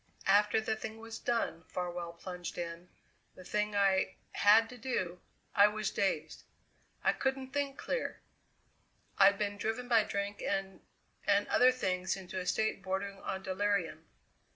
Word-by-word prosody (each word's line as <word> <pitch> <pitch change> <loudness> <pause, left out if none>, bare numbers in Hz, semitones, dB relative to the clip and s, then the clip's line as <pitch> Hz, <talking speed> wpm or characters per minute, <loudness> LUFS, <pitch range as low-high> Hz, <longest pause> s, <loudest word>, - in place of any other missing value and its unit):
"After 210 +2 +4
the 220 0 -1
thing 220 0 -6
was 225 0 -8
done," 230 -9 -1
Farwell 175 -1 -4
plunged 175 0 -7
in, 170 0 -5 0.5
"the 185 - -11
thing 210 +2 -1
I 195 -1 +3 0.2
had 215 +3 +6
to 250 - -10
do 185 -8 -2 0.3
I 205 - +7
was 215 -1 -2
dazed; 195 - -1 0.6
I - - +4
couldn't 265 -1 -2
think 280 -1 -1
clear. - - -3 1.0
I'd 200 0 +7
been 205 0 -2
driven 225 +4 -2
by 230 -3 +5
drink 200 0 -3
and 195 -1 -2 0.5
and 200 0 +3
other 255 +1 +6
things 185 -7 -1
into 190 0 -5
a 180 - -5
state 220 -2 0
bordering 195 +1 -3
on 190 0 -4
delirium. 185 -4 -1
200 Hz, 150 wpm, -33 LUFS, 185-220 Hz, 1.0 s, I